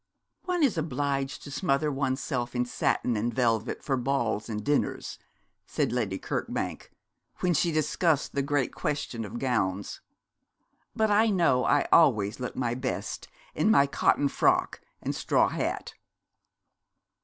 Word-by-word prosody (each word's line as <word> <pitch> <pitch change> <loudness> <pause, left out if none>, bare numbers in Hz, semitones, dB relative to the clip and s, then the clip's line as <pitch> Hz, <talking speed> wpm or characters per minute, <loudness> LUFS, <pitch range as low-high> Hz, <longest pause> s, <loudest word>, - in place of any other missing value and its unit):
'One 360 -3 0
is 235 - +2
obliged 140 -2 -2
to 145 - -9
smother 150 -1 0
one's 135 -1 -1
self 120 -2 -3
in 125 0 +1
satin 125 0 0
and 115 +3 -1
velvet 115 -3 0
for 135 - 0
balls 120 -4 -1
and 105 -1 -4
dinners,' 145 0 -1 0.5
said - - -1
Lady 110 -6 -1
Kirkbank, - - -4 0.5
when 180 -1 +2
she 170 +2 +2
discussed 155 0 +1
the 140 - 0
great 140 -2 0
question 140 -6 -3
of 110 +2 -6
gowns; 100 -7 -1 0.9
'but 220 -1 +2
I 215 +2 +4
know 170 -10 +3
I 145 - +3
always 110 -11 +4
look 125 - -5
my 120 -2 -1
best 130 +1 -4 0.3
in - - +1
my 140 -10 +6
cotton 140 +1 +2
frock - - +1 0.2
and - - -1
straw - - +2
hat.' - - -3
135 Hz, 145 wpm, -28 LUFS, 120-150 Hz, 0.9 s, my